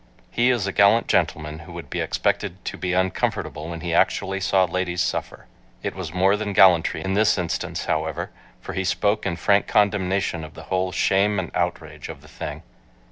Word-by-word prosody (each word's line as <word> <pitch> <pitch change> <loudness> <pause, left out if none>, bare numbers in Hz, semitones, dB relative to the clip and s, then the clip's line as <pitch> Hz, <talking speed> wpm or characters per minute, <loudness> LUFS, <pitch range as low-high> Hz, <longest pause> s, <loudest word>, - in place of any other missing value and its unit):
He 120 +1 +2
is 120 -6 +1
a 100 - -1
gallant 100 +4 +4
gentleman 75 +1 0
who 85 +1 -11
would 85 0 -9
be - - -2
expected 90 +1 -1
to - - -4
be 90 -1 -3
uncomfortable 90 -3 -1
when 85 -1 -6
he 85 -1 -3
actually 95 +3 +1
saw 95 0 +3
ladies 90 0 -2
suffer. - - -4 0.4
It - - -2
was 90 -5 -6
more 95 +3 +3
than 105 -1 -3
gallantry 90 -4 +5
in 95 - -1
this 105 +1 +3
instance, 90 -2 -3
however, 80 -1 -2 0.3
for - - -7
he 95 - -1
spoke 100 +2 0
in 85 - -1
frank 100 +3 +2
condemnation 95 -4 +1
of 80 0 -10
the 80 - -10
whole 95 0 0
"shame 100 +3 +2
and 95 -2 -3
outrage" - - -3
of - - -8
the - - -15
thing. - - -7
95 Hz, 190 wpm, -23 LUFS, 85-100 Hz, 0.4 s, gallantry